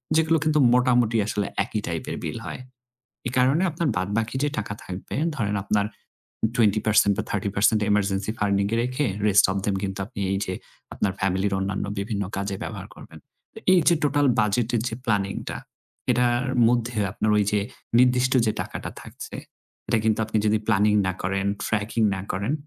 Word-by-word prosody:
যেগুলো 160 0 +4
কিন্তু 155 -1 +2
মোটামুটি 125 -2 +3
আসলে 105 -1 -1 0.2
একই 105 +1 -3
টাইপের 85 -1 -3
বিল - - -3
হয়। - - -6 0.7
এই 125 - -2
কারণে 135 +7 +3
আপনার 165 0 -1
বাদ 90 +1 -1
বাকি 115 +3 -2
যে 145 - +2
টাকা 100 -1 -3
থাকবে, 90 +1 -7 0.2
ধরেন 105 -4 -1
আপনার 105 0 +1 0.7
20% 110 -2 +3
বা - - -1
30% 100 +2 +2
এমার্জেন্সি 100 0 +1
ফান্ডিং 100 -1 +2
এ - - +3
রেখে 125 +4 -1 0.2
rest 100 -1 +6
of 95 - -2
them 100 - 0
কিন্তু 95 -1 -3
আপনি 110 0 -9
এই 95 - +1
যে 95 - -3 0.4
আপনার 95 - 0
ফ্যামিলির 95 +1 0
অন্যান্য 95 +1 -2
বিভিন্ন 100 0 -2
কাজে 100 0 -2
ব্যবহার - - -6
করবেন। - - -13 0.5
এই 185 - +6
যে 170 - +6
টোটাল 145 0 +2
বাজেটের 110 +2 +1
যে 115 - -5
প্ল্যানিংটা 100 -3 -1 0.5
এটার 120 0 +2 0.2
মধ্যে 120 0 0
আপনার 110 - -1
ওই 105 - +4
যে 105 - +2 0.4
নির্দিষ্ট 125 0 +4
যে 110 - +2
টাকাটা - - -6
থাকছে, - - -9 0.5
এটা - - +2
কিন্তু 110 0 +2
আপনি 110 0 -1
যদি 105 +1 +3
প্ল্যানিং 105 -1 +3
না 95 - 0
করেন, 95 +1 -1 0.2
ট্র্যাকিং 110 +1 -1
না 95 - -4
করেন 100 +8 -1
105 Hz, 170 wpm, -24 LUFS, 100-125 Hz, 0.7 s, rest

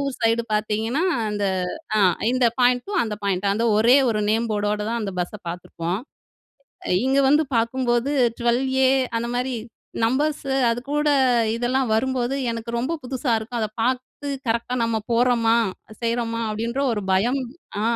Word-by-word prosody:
ஊர் 275 -2 -2
சைடு 230 0 +2
பார்த்தீங்கன்னா, 220 +7 0 0.3
அந்த 205 -1 -2 0.5
அ - - +3 0.3
இந்த 255 -1 +3
பாயிண்ட்டும், 250 +11 +2
அந்த 215 - -3
பாயிண்ட்டும், 195 +1 +1
அந்த 230 - 0
ஒரே 235 +4 +6
ஒரு 215 - 0
நேம் 225 +1 +1
போர்டோட 210 0 -1
தான் 235 0 -1
அந்த 195 -2 -3
பஸ்ஸ 180 +4 -4
பார்த்துருப்போம். 175 +1 -4 0.9
அ - - -5 0.2
இங்க 270 +1 +3
வந்து 300 +2 +4
பார்க்கும்போது 240 +2 0 0.3
ட்வெல் 240 +2 +2 0.2
ஏ - - +5 0.3
அந்த 235 +1 -3
மாரி 250 0 -1 0.5
நம்பர்ஸு 275 +3 0 0.2
அதுகூட 285 +5 -1 0.5
இதெல்லாம் 250 +2 0
வரும்போது, 260 +2 0 0.2
எனக்கு 230 0 -5
ரொம்ப 275 +7 -1
புதுசா 255 0 -2
இருக்கும். 235 +2 -4
அத 215 - 0
பார்த்து 255 +4 -2 0.2
கரெக்ட்டா 235 +2 0
நம்ம 230 -1 0
போறோமா! 235 -1 +3 0.5
செய்றோமா! 230 0 -1
அப்பிடின்ற 230 +5 -2
ஒரு 210 - -2
பயம் 235 +9 +2 0.4
ஆ, - - -1
235 Hz, 145 wpm, -23 LUFS, 220-255 Hz, 0.9 s, ஒரே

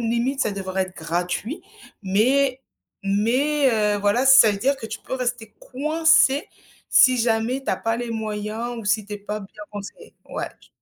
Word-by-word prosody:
limite 235 +4 -1
ça 215 - 0
devrait 190 -1 -2
être 185 0 -8
gratuit, 175 - -3 0.4
mais 250 +7 +2 0.5
mais, 260 +8 +2
heu, 210 -2 +1
voilà, 205 +6 +1
ça 265 -5 +8
veut 205 - -2
dire 275 +6 +1
que 265 - -10
tu 220 0 -6
peux - - -5
rester 245 -4 -4
coincée 300 0 +2 0.4
si 255 -1 +6
jamais 230 +3 0
tu - - -1
as - - 0
pas 225 0 -1
les 240 -1 -4
moyens 220 +2 -4
ou 225 - -8
si 205 0 0
tu 210 - -9
es - - -7
pas 210 +1 -5
bien 210 +1 -12
conseillée. 205 -1 -10
Ouais - - -4
je - - -21
225 Hz, 185 wpm, -23 LUFS, 205-260 Hz, 0.5 s, ça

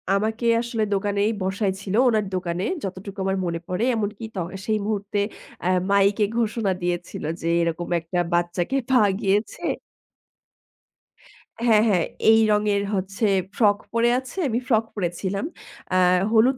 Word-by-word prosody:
আমাকে 220 +3 -1 0.2
আসলে 235 -2 -2
দোকানেই 205 +2 +1
বসায় 190 +1 0
ছিলো 200 +1 -2
ওনার 215 -3 +1
দোকানে 180 0 -2 0.2
যতটুকু 195 +1 -6
আমার 190 0 0
মনে 170 -1 -2
পড়ে। 180 +5 -1
এমনকি 210 +1 -3
ত - - -6 0.3
সেই 215 -1 +1
মুহূর্তে 205 -1 -2 0.5
আ - - +2 0.2
মাইকে 200 +1 +4
ঘোষণা 220 -3 0
দিয়েছিল 175 0 -3 0.2
যে 165 - -3
এরকম 170 +1 -1
একটা 170 +2 -3
বাচ্চাকে 175 +8 0
পাওয়া 245 -6 +5
গিয়েছে। 205 +1 0 2.0
হ্যাঁ, 215 -2 +6
হ্যাঁ, 185 -6 +3 0.3
এই 225 - +6
রঙের 210 -1 +2
হচ্ছে 195 +3 -1 0.3
ফ্রক 205 -3 +4 0.2
পড়ে 230 +1 +3
আছে। 260 +6 -11
আমি 230 - 0
ফ্রক 225 -3 +3
পড়ে 185 -5 0
ছিলাম। 195 +5 -2 0.5
আ - - +2 0.4
হলুদ 240 +4 +4
205 Hz, 140 wpm, -24 LUFS, 185-220 Hz, 2.0 s, হ্যাঁ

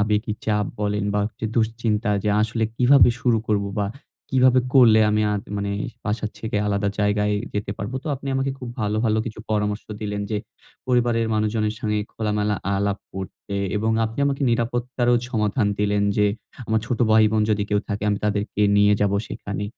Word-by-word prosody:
আবেগি 105 +1 +1
চাপ 105 -1 +1 0.2
বলেন 105 0 0
বা 105 - +2
একটু 110 - -9
দুশ্চিন্তা 110 -1 0
যে - - +1
আসলে 110 +1 0
কিভাবে 130 +1 +6
শুরু 120 -3 +2
করব? 105 -2 +1 0.2
বা 100 - +1 0.4
কিভাবে 130 -1 +5
করলে 115 -4 +7
আমি 105 0 +2
আ - - +1 0.2
মানে 100 0 -2 0.3
বাসার 105 0 -2
থেকে 110 -2 -3
আলাদা 100 0 0
জায়গায় 105 0 +1 0.2
যেতে 105 -1 -2
পারবো? 105 +6 -4
তো - - -9
আপনি 140 +1 -7
আমাকে 135 +1 0
খুব 125 - -7
ভালো, 105 0 0
ভালো 110 0 +2
কিছু 110 - -6
পরামর্শ 105 0 0 0.2
দিলেন 105 -1 -3
যে 105 - 0 0.5
পরিবারের 120 -2 +2
মানুষজনের 110 0 0
সঙ্গে 105 -1 0
খোলা-মেলা 105 -1 -1 0.2
আলাপ 100 +1 0 0.2
করতে, 95 +1 -6 0.2
এবং 110 +2 0
আপনি 110 +4 -5
আমাকে 140 0 -1
নিরাপত্তারও 120 +1 0 0.2
সমাধান 105 0 +1
দিলেন। 105 0 +1
যে 105 - +4 0.4
আমার 110 0 +2
ছোট 125 -3 -2
ভাই-বোন 110 0 +4
যদি 105 -1 +1
কেউ 105 0 +2
থাকে 105 -1 -3
আমি 100 - 0
তাদেরকে 105 0 -1 0.2
নিয়ে 105 0 +5
যাবো 100 -1 +2
সেখানে। 105 0 -5
105 Hz, 175 wpm, -23 LUFS, 105-115 Hz, 0.5 s, করলে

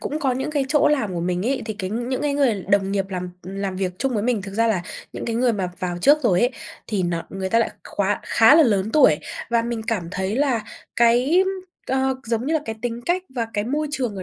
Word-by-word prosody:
cũng 300 - -3
có 270 -4 +1
những 265 +4 -2
cái 285 -3 0
chỗ 300 0 +4
làm 270 -10 0
của 170 - -2
mình 180 +3 -1
ấy, 270 +1 0
thì 220 - -3
cái 190 -2 -4
những 240 +5 -2
cái 290 -1 0
người 240 -9 +1
đồng 195 -1 +2
nghiệp 195 -1 +1
làm, 180 -2 -4
ừm, 190 +2 -8
làm 195 -1 -3
việc 185 -1 -1
chung 270 -1 0
với 210 - 0
mình 230 -4 0
thực 195 0 -8
ra 230 +2 +2
là 210 -6 +1 0.3
những - - -6
cái 230 -1 -2
người 245 0 +3
mà 190 -4 -2
vào 175 -1 -3
trước 285 +11 +5
rồi 190 -7 +3
ấy, 245 - +3 0.4
thì 205 -4 -1
nó 175 -1 -1
người 190 -1 -4
ta 230 - +4
lại 230 - +1 0.2
khóa 200 0 0
khá 225 +5 +5
là 325 - +7
lớn 210 -6 +2
tuổi. 260 - +5 0.3
Và 235 -1 +3
mình 235 -1 -3
cảm 195 -8 -1
thấy 190 +3 -2
là 260 -6 +1 0.3
cái, 245 +10 +4 0.4
ờ, 265 0 +1
giống 230 +2 -1
như 320 - +1
là 315 - +2
cái 225 - -4
tính 240 -1 -3
cách 360 +2 +1
và 235 -3 -1
cái 205 -1 0
môi 295 +6 -1
trường 250 -8 -2
ở 190 - -5
230 Hz, 260 wpm, -22 LUFS, 195-265 Hz, 0.4 s, là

